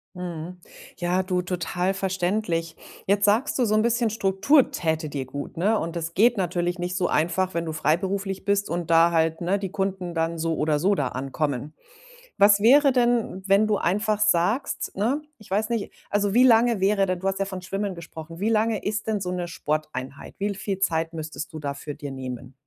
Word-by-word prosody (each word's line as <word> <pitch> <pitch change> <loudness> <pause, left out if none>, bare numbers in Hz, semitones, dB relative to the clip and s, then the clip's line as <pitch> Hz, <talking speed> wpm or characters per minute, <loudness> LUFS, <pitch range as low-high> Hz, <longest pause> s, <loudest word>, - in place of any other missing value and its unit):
Mhm. 180 0 -6 0.4
Ja, 180 +1 +1
du, 185 -1 0
total 180 +1 -1
verständlich. 185 -3 -1 0.3
Jetzt 200 +1 +2
sagst 225 +7 +2
du 245 - +4
so 215 - +1
'n 215 - +4
bisschen 235 0 +2
Struktur 215 +7 +3
täte 160 -2 -1
dir 140 -2 -4
gut, 140 +4 -7
ne? 210 +5 +2
Und 170 +1 -4
das 165 0 -4
geht 230 +4 +4
natürlich 175 -1 -1
nicht 180 +1 -3
so 180 -1 +1
einfach, 180 +3 0
wenn 170 0 -2
du 160 - -4
freiberuflich 190 +5 -1
bist 200 0 +1
und 170 -1 -3
da 165 +1 +5
halt, 160 0 +1
ne, 190 +3 +1
die 195 - -4
Kunden 190 -3 -2
dann 165 +1 -1
so 165 0 0
oder 150 -1 +1
so 195 +5 +2
da 135 -6 -1
ankommen. 140 +2 -3 0.6
Was 200 0 +6
wäre 275 +5 +6
denn, 240 -6 +1
wenn 200 +2 +4
du 210 -2 +1
einfach 210 +3 0
sagst, 215 +5 +1
ne 250 +9 0 0.2
ich 215 - -17
weiß 215 +3 0
nicht, 230 -4 -2 0.2
also 205 0 +1
wie 250 - +6
lange 235 -3 +5
wäre 195 0 +3
denn 185 -1 -1
du 190 - -4
hast 195 - -1
ja - - +2
von 190 -2 -6
Schwimmen 195 +1 -3
gesprochen, 165 -1 -10
wie 205 +4 0
lange 220 0 +1
ist 210 +1 -2
denn 215 -2 -1
so 180 -1 -3
'ne 175 -1 -3
Sporteinheit? 150 -4 -4
Wie 200 - -1
l 200 - -3
viel 195 -1 -3
Zeit 165 -3 0
müsstest 160 +1 -6
du 155 - -6
dafür 145 0 -5
dir 145 0 -7
nehmen? 130 -1 -7
185 Hz, 205 wpm, -25 LUFS, 165-205 Hz, 0.6 s, Was